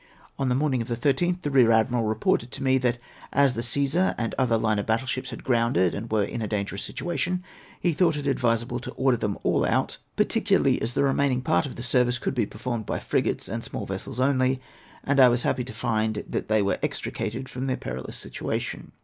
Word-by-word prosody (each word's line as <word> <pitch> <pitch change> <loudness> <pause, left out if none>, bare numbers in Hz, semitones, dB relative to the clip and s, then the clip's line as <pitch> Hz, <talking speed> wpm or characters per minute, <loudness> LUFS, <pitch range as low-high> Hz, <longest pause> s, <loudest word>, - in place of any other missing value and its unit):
On 135 -1 +1
the 125 - +2
morning 135 -3 +1
of 115 - -4
the 120 - -1
loth, 160 +9 +1
the 145 - -1
Kear 125 -4 +5
Admiral 115 +1 +2
reported 110 +2 +1
to - - -4
me, 130 0 +3
that 125 -1 +1 0.3
as 140 -2 +4
the 115 - -3
Gcesar 140 +9 +2
and 115 -1 -2
other 120 -3 +2
line 110 -1 +1
of 100 - -4
battle 115 +4 +1
ships 130 0 -3
had 115 - -8
grounded, 115 -8 +2
and 115 +3 -5
were 110 -1 +2
in 115 +4 -4
a 110 - -2
dangerous 100 -1 -2
situation, 180 +1 -2 0.4
he 175 - +1
thought 165 -1 +2
it 145 - -4
advisable 120 -2 0
to 120 - -7
order 130 -2 +2
them 105 -2 -2
all - - +2
out, - - 0 0.2
particularly - - +2
as 115 +2 -2
the 140 - +2
remaining 135 -2 +1
part 140 - +2
of 130 - -8
the 120 - -6
service 125 0 +2
could - - -2
be 120 -5 0
performed 115 0 -4
b}^ - - -1
frigates - - 0
and - - -4
small - - -4
vessels 120 - -5
only; 130 -1 +2 0.4
and 140 0 +1
I 130 - +9
was 120 0 +1
happy 125 - 0
to 130 - -7
find 110 -2 -1
that - - -3
they 110 -1 +3
were 100 - 0
extricated 130 - -3
from 130 +1 -4
their 130 - 0
peril 65 +2 -6
ous - - -4
situation. - - -4
125 Hz, 225 wpm, -26 LUFS, 115-135 Hz, 0.4 s, I